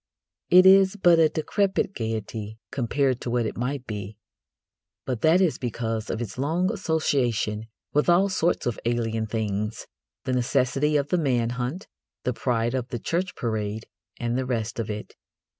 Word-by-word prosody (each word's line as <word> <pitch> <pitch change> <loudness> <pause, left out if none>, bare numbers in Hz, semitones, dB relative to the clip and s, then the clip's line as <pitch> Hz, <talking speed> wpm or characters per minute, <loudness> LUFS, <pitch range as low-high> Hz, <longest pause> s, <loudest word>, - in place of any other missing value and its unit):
It 185 +1 +8
is 190 +1 +7
but 175 -4 +5
a 160 -1 +5
decrepit 190 +5 0
gaiety 110 - -4
compared 130 0 0
to - - -4
what 120 -1 +1
it - - -3
might 130 +2 -3
be. 105 -2 -6 0.9
But 125 -4 -3
that 165 +4 +5
is 180 -5 +2
because 115 -3 -3
of - - -2
its 120 +1 -5
long 170 +9 +1
association 125 - 0 0.3
with 150 +4 +2
all 180 +3 +5
sorts 180 -3 0
of 120 -3 -2
alien 115 -2 -1
things 105 -1 -2 0.4
the 130 - -1
necessity 135 +4 +2
of 140 0 -1
the 180 - +2
man 120 -6 +1
hunt, 125 +9 -4 0.4
the 125 - 0
pride 120 -1 0
of 125 -2 -2
the 125 -2 -4
church 180 - -2
parade, 110 -3 -3 0.3
and 120 0 -1
the 130 0 0
rest 115 -2 -2
of 110 - -3
it. 105 0 -6
125 Hz, 165 wpm, -25 LUFS, 115-155 Hz, 0.9 s, It